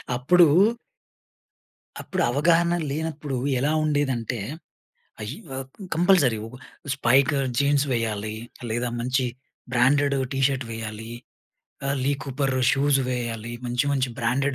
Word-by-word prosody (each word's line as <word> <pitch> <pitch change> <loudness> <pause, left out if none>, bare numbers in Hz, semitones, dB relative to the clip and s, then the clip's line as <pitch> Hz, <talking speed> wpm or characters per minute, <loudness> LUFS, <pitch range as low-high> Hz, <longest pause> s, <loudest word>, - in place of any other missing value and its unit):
అప్పుడూ... 170 +8 +5 1.5
అప్పుడు 185 - -3
అవగాహన 170 +5 +3 0.2
లేనప్పడు, 150 -2 -3 0.2
ఎలా 145 +4 +1
ఉండేదంటే 135 -6 0 0.9
అయ్యో 130 +4 -7 0.4
కంపల్సరీ 165 - +4 0.6
స్పైక్ 135 +2 +3 0.3
జీన్స్ 140 0 +3
వేయాలి. 110 -2 -2 0.4
లేదా 120 +2 -1
మంచి 130 +2 0 0.5
బ్రాండెడ్ 140 +3 +3 0.2
టీ 135 - -2
షర్ట్ 135 -3 -3
వేయాలి. 110 0 -6 0.8
ఆహ్, 140 +1 0
లీ 140 - +2
కూపర్ 135 -1 -1 0.2
షూస్ 140 0 +2
వేయాలి. 120 -2 -3
మంచి, 125 +2 0
మంచి 130 -2 0
బ్రాండెడ్ 130 +3 0
135 Hz, 105 wpm, -24 LUFS, 120-145 Hz, 1.5 s, అప్పుడూ